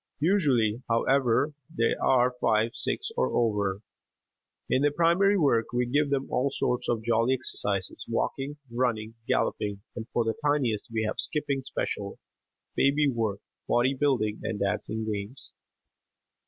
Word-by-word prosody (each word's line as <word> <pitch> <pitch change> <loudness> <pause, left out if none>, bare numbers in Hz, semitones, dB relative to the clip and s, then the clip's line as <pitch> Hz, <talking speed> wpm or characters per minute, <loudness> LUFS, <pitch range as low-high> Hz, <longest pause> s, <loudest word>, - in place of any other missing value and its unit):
Usually, 130 - +2
however, 130 +4 +2 0.2
they 115 0 +1
are 125 -1 +3
five, 110 +1 +2
six, - - -3
or 65 0 0
over. 105 -4 +1 0.9
In 130 - +2
their 145 - +4
primary 175 +6 +3
work 125 -9 +3
we 125 0 +1
give 145 +4 +1
them 140 -1 0
all 130 +3 +1
sorts 125 -2 -1
of 115 -2 0
jolly 115 +3 +2
exercises 100 -6 -3
walking, 140 +2 -2
running, 115 -3 -1
galloping, 100 -1 -1
and 115 0 -6
for 120 - +1
the 115 - +1
tiniest 135 -8 +1
we 110 -1 0
have 110 - -3
"skipping 140 -3 -1
special," 100 -6 -4 0.6
"baby 145 +2 +3
work," 110 -4 -2 0.3
body 125 +3 +3
building 130 -7 0
and 110 -2 -3
dancing 110 +2 -2
games. 105 +4 -5
120 Hz, 140 wpm, -27 LUFS, 110-140 Hz, 0.9 s, their